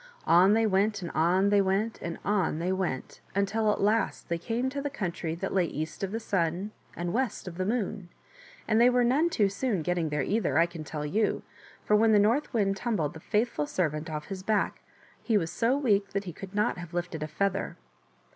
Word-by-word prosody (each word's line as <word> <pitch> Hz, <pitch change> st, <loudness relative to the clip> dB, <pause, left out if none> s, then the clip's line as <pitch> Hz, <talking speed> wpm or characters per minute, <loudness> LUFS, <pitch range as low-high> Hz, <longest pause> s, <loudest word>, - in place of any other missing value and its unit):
On 185 Hz, +4 st, +6 dB
they 225 Hz, 0 st, +3 dB
went 200 Hz, 0 st, +1 dB
and 170 Hz, -, -4 dB
on 180 Hz, +5 st, +3 dB
they 205 Hz, 0 st, +4 dB
went 195 Hz, +4 st, 0 dB
and 170 Hz, -1 st, -4 dB
on 200 Hz, -6 st, +1 dB
they 175 Hz, +3 st, -1 dB
went, 185 Hz, -8 st, -3 dB
until 210 Hz, +2 st, +2 dB
at -, -, -2 dB
last 215 Hz, 0 st, +1 dB
they 170 Hz, 0 st, -1 dB
came 235 Hz, +8 st, -1 dB
to 280 Hz, +1 st, -3 dB
the 285 Hz, -, -2 dB
country 170 Hz, -, -3 dB
that 190 Hz, +3 st, -4 dB
lay 185 Hz, -2 st, +3 dB
east 155 Hz, +3 st, -5 dB
of 195 Hz, -, -2 dB
the 225 Hz, -, -2 dB
Sun 185 Hz, -1 st, -1 dB, 0.2 s
and 175 Hz, 0 st, -3 dB
west 255 Hz, -6 st, -1 dB
of 175 Hz, 0 st, -7 dB
the 185 Hz, -, 0 dB
Moon; 205 Hz, -5 st, -2 dB, 0.6 s
and 220 Hz, +1 st, +3 dB
they 245 Hz, -, +7 dB
were 250 Hz, 0 st, +3 dB
none 280 Hz, +8 st, +3 dB
too 210 Hz, -11 st, +2 dB
soon 195 Hz, -2 st, -1 dB
getting 175 Hz, -1 st, 0 dB
there 150 Hz, -2 st, 0 dB
either, 195 Hz, -8 st, 0 dB
I 165 Hz, -, +6 dB
can 170 Hz, -2 st, -8 dB
tell 150 Hz, 0 st, -5 dB
you, 205 Hz, +8 st, 0 dB, 0.4 s
for 210 Hz, -, +4 dB
when 220 Hz, +1 st, +5 dB
the -, -, +6 dB
North 230 Hz, +9 st, +2 dB
Wind 195 Hz, -4 st, +1 dB
tumbled 195 Hz, -10 st, -1 dB
the 160 Hz, -, -9 dB
faithful 210 Hz, -6 st, 0 dB
servant 155 Hz, -3 st, -1 dB
off 150 Hz, -1 st, -4 dB
his 195 Hz, -2 st, -6 dB
back 210 Hz, +2 st, 0 dB, 0.4 s
he 225 Hz, -3 st, +2 dB
was 165 Hz, -4 st, -1 dB
so 240 Hz, +4 st, +1 dB
weak 205 Hz, -8 st, +1 dB
that 200 Hz, 0 st, -1 dB
he 175 Hz, -4 st, -7 dB
could 195 Hz, +4 st, -9 dB
not 210 Hz, -3 st, +1 dB
have 175 Hz, 0 st, -8 dB
lifted 175 Hz, -2 st, -3 dB
a 155 Hz, -, -2 dB
feather. 195 Hz, +5 st, -1 dB
195 Hz, 220 wpm, -28 LUFS, 170-220 Hz, 0.6 s, they